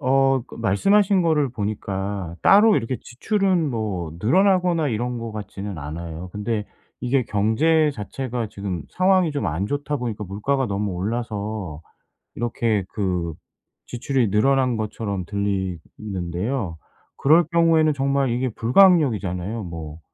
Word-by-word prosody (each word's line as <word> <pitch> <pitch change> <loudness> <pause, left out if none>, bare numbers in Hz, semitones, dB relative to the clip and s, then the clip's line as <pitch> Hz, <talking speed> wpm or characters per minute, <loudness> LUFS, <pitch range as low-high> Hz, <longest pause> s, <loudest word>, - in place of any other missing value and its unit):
어 135 0 +3
그 - - -12
말씀하신 190 - +3
거를 155 -4 +2
보니까 100 -4 -4
따로 210 +1 +6
이렇게 120 +2 -2
지출은 185 - 0
뭐 100 -9 -3
늘어나거나 180 - +3
이런 120 +1 -2
것 115 -1 -6
같지는 105 -2 -6
않아요. 80 +4 -6
근데 105 +1 -2 0.4
이게 130 +1 +1
경제 150 +10 +2
자체가 120 +1 -4
지금 100 -4 -5
상황이 185 -2 +3
좀 145 -8 -2
안 85 +4 -1
좋다 145 +3 -2
보니까 115 -5 -4
물가가 125 +8 -1
너무 100 0 -2
올라서 105 -4 -4 0.5
이렇게 115 -3 0
그 90 -5 -2 0.5
지출이 125 -1 0
늘어난 130 +2 +2
것처럼 105 -3 -3
들리는데요. 95 - -3 0.4
그럴 160 +5 +5
경우에는 165 -2 +3
정말 140 -1 +1
이게 125 +2 0
불가항력이잖아요. 115 - +3
뭐 80 -3 -7
115 Hz, 300 characters per minute, -23 LUFS, 100-140 Hz, 0.5 s, 따로